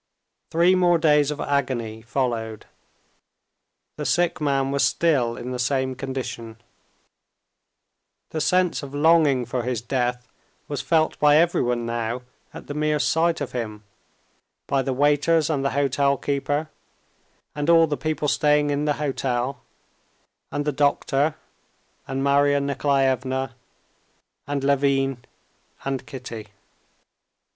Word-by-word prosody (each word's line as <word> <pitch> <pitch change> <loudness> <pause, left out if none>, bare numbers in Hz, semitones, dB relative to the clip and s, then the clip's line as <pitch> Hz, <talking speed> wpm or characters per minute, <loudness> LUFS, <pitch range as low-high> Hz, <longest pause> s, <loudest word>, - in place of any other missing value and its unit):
Three 170 +3 +4
more 175 -2 +4
days 150 -3 +3
of 150 -1 -4
agony 120 -6 -2
followed; 115 -2 -3 1.3
the - - -4
sick 175 -2 +1
man 135 -2 +1
was 140 0 +1
still 130 -8 +1
in 125 +1 -6
the 125 - -4
same 130 +1 0
condition. 125 -4 -6 1.7
The 155 - -2
sense 180 0 +2
of 140 -1 -8
longing 145 -4 +4
for 120 +1 -2
his 125 -1 -2
death 125 0 -2 0.4
was 145 -3 -3
felt 160 -2 +1
by 150 0 +5
everyone 125 -8 +1
now 115 +1 -3 0.3
at - - -10
the 145 - -6
mere 150 0 +1
sight 165 +2 +1
of 145 - -3
him, 110 -4 -5 0.8
by 135 - +1
the 135 - -2
waiters 150 +4 +2
and 140 -3 -1
the 140 - +1
hotel 140 0 +2
keeper 145 +3 -2 0.8
and 145 +2 -2
all 165 -1 +7
the 150 -2 -2
people 155 0 -2
staying 150 0 +2
in 145 +1 -1
the 150 - +2
hotel, 135 -3 -2 0.9
and 145 0 -2
the 150 - +1
doctor 145 +1 +1 0.7
and 135 0 -2
Marya 140 0 +3
Nikolaevna 135 -2 0 0.9
and 145 -1 -2
Levin 135 -2 +1 0.6
and 135 -1 -3
Kitty. 120 -5 -8
140 Hz, 125 wpm, -23 LUFS, 125-150 Hz, 1.7 s, all